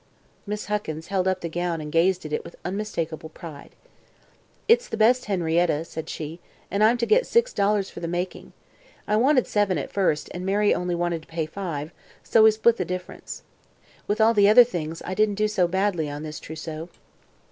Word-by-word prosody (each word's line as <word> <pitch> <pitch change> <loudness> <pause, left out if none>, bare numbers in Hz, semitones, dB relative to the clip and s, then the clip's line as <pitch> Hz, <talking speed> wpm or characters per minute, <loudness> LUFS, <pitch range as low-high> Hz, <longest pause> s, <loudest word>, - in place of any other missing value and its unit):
Miss 210 +1 -4
Huckins 170 -6 -4
held 190 -1 0
up 185 0 0
the 170 - -3
gown 170 0 -2
and 150 -1 -6
gazed 175 +2 +2
at 150 - -5
it - - -1
with 170 - -11
unmistakable 170 -5 -4
pride. 155 -3 -11 0.9
"It's 480 +2 +4
the - - -4
best 245 +3 +4
Henrietta," 170 -4 +1
said 160 -1 -7
she, 160 +2 -6 0.3
"and 200 +3 +2
I'm 230 +3 +5
to 235 - 0
get 485 - +3
six 470 +2 +2
dollars 200 -1 +1
for - - -8
the 170 - -4
making. 175 +2 -4 0.6
I 210 - +2
wanted 255 +3 +4
seven, 205 -4 +1
at 140 - -4
first, 180 -7 +1
and 180 - -5
Mary 205 +2 +2
only 180 0 -1
wanted 170 -1 -1
to - - -20
pay 165 -1 -2
five, 155 -3 -5 0.3
so 225 - +4
we 220 - +8
split 220 +2 +3
the - - 0
difference. 180 +1 -7 0.6
With 210 +2 -1
all 220 +1 +5
the 205 -2 +5
other 245 +3 +9
things, 165 -8 -5
I 185 - -3
didn't 210 +1 +2
do 215 +1 +1
so 195 -4 +1
badly 185 -4 0
on 145 +1 -6
this 155 -2 -6
trousseau." 160 +1 -7
185 Hz, 200 wpm, -24 LUFS, 165-210 Hz, 0.9 s, other